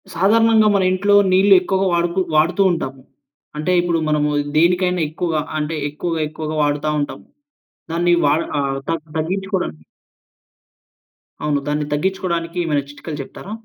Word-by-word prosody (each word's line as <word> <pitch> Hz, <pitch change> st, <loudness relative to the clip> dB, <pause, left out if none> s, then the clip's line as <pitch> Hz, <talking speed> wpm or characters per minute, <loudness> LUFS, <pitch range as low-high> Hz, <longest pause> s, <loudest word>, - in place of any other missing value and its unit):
సాధారణంగా 220 Hz, +3 st, +4 dB
మన 195 Hz, -, +2 dB
ఇంట్లో 200 Hz, +2 st, +2 dB, 0.2 s
నీళ్లు 195 Hz, +2 st, +5 dB
ఎక్కువగా 190 Hz, +1 st, 0 dB
వాడుకు 170 Hz, +2 st, 0 dB, 0.2 s
వాడుతూ 170 Hz, +5 st, +3 dB
ఉంటాము. 135 Hz, -6 st, -4 dB, 0.6 s
అంటే, 155 Hz, +4 st, -1 dB
ఇప్పుడు 170 Hz, -1 st, 0 dB
మనము 150 Hz, -1 st, +1 dB, 0.3 s
దేనికైనా 180 Hz, +2 st, +2 dB
ఎక్కువగా 160 Hz, -1 st, -2 dB, 0.2 s
అంటే, 155 Hz, +1 st, -2 dB
ఎక్కువగా, 165 Hz, +2 st, -3 dB
ఎక్కువగా 155 Hz, 0 st, -5 dB
వాడతా 145 Hz, +1 st, 0 dB
ఉంటం. 145 Hz, -, -4 dB, 0.7 s
దాన్ని 175 Hz, +1 st, +2 dB
వాడ 145 Hz, +2 st, +3 dB, 0.2 s
ఆహ్, 135 Hz, -1 st, -1 dB
దాన్ని 160 Hz, -2 st, -4 dB
తగ్గించుకోవడాని 185 Hz, -, -2 dB, 1.7 s
అవును. 150 Hz, -1 st, +1 dB
దాన్ని 150 Hz, 0 st, -1 dB
తగ్గించుకోవడానికి 170 Hz, 0 st, -2 dB
ఏమైనా 150 Hz, -4 st, 0 dB
చిట్కాలు 145 Hz, +1 st, -8 dB
చెప్తారా? 185 Hz, +8 st, -10 dB
165 Hz, 125 wpm, -19 LUFS, 150-185 Hz, 1.7 s, నీళ్లు